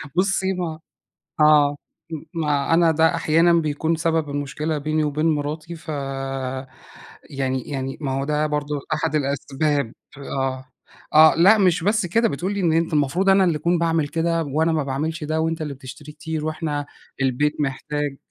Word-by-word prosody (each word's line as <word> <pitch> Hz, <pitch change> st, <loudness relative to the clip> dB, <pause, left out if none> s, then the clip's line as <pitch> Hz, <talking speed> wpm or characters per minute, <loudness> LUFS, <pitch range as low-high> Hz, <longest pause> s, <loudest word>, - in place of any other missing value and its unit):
بُصّي 190 Hz, +1 st, +1 dB
ما 170 Hz, -4 st, -4 dB, 0.6 s
آه 150 Hz, -1 st, +5 dB, 0.3 s
م 160 Hz, -2 st, -5 dB, 0.2 s
ما 150 Hz, 0 st, +1 dB
أنا 170 Hz, -1 st, +5 dB
ده 160 Hz, +2 st, +3 dB
أحيانًا 165 Hz, +1 st, +3 dB
بيكون 160 Hz, 0 st, +1 dB
سبب 160 Hz, -2 st, 0 dB
المشكلة 145 Hz, +2 st, -3 dB
بيني 155 Hz, +1 st, 0 dB
وبين 150 Hz, +2 st, 0 dB
مراتي 155 Hz, +2 st, -2 dB
فيعني 135 Hz, -2 st, -5 dB
يعني 135 Hz, -1 st, -5 dB
ما 135 Hz, -3 st, -2 dB
هو 135 Hz, +1 st, -1 dB
ده 150 Hz, +1 st, 0 dB
برضه 150 Hz, -1 st, -2 dB
أحد 155 Hz, 0 st, -2 dB
الأسباب، 140 Hz, -2 st, -1 dB, 0.3 s
آه. 135 Hz, -2 st, -3 dB, 0.5 s
آه 155 Hz, +1 st, +8 dB
لأ 195 Hz, +7 st, +6 dB
مش 180 Hz, -3 st, +3 dB
بس 210 Hz, -2 st, +2 dB
كده، 230 Hz, +7 st, +2 dB
بتقول 180 Hz, +8 st, -3 dB
لي 200 Hz, -, -2 dB
إن 170 Hz, -3 st, +2 dB
أنت 165 Hz, 0 st, +1 dB
المفروض 150 Hz, +6 st, +1 dB
أنا 195 Hz, 0 st, +5 dB
اللي 170 Hz, -4 st, +1 dB
أكون 170 Hz, +3 st, +1 dB
باعمل 165 Hz, -3 st, +1 dB
كده 165 Hz, +1 st, 0 dB
وأنا 155 Hz, +3 st, +1 dB
ما 155 Hz, -3 st, 0 dB
باعملش 155 Hz, +4 st, -3 dB
ده 155 Hz, +1 st, -1 dB
وأنت 160 Hz, 0 st, -1 dB
اللي 150 Hz, -2 st, -4 dB
بتشتري 140 Hz, +3 st, -11 dB
كتير 155 Hz, 0 st, -5 dB
وإحنا 155 Hz, -2 st, -3 dB, 0.4 s
البيت 135 Hz, +4 st, 0 dB
محتاج. 145 Hz, +1 st, -2 dB
155 Hz, 160 wpm, -22 LUFS, 145-165 Hz, 0.6 s, آه